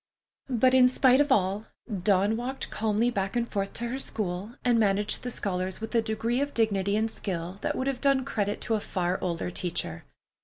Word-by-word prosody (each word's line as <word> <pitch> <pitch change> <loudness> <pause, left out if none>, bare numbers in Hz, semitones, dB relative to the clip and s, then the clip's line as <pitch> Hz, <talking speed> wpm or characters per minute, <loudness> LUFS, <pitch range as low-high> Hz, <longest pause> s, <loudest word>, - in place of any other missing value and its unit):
But 255 +1 +3
in 255 -1 +7
spite 260 +1 +5
of 290 -1 +1
all, 200 -1 +2 0.3
Dawn 200 +2 +3
walked 255 +3 -4
calmly 220 +2 +1
back 195 -1 -2
and 235 -1 +1
forth 195 -3 -3
to 240 - -3
her 260 +3 -3
school, 205 -2 -3
and 240 -2 +4
managed 205 -1 +2
the 250 - -4
scholars 185 -4 -3
with 220 +1 -6
a 230 - +4
degree 225 +3 -1
of 285 0 -2
dignity 200 -3 +1
and 220 +1 +1
skill 180 -2 -5
that - - -1
would 260 - -2
have 270 -2 -2
done 275 -2 +3
credit 205 -6 -2
to 225 - -1
a 220 - +2
far 180 -2 -2
older 175 0 -2
teacher. 170 - -3
220 Hz, 200 wpm, -28 LUFS, 195-245 Hz, 0.3 s, in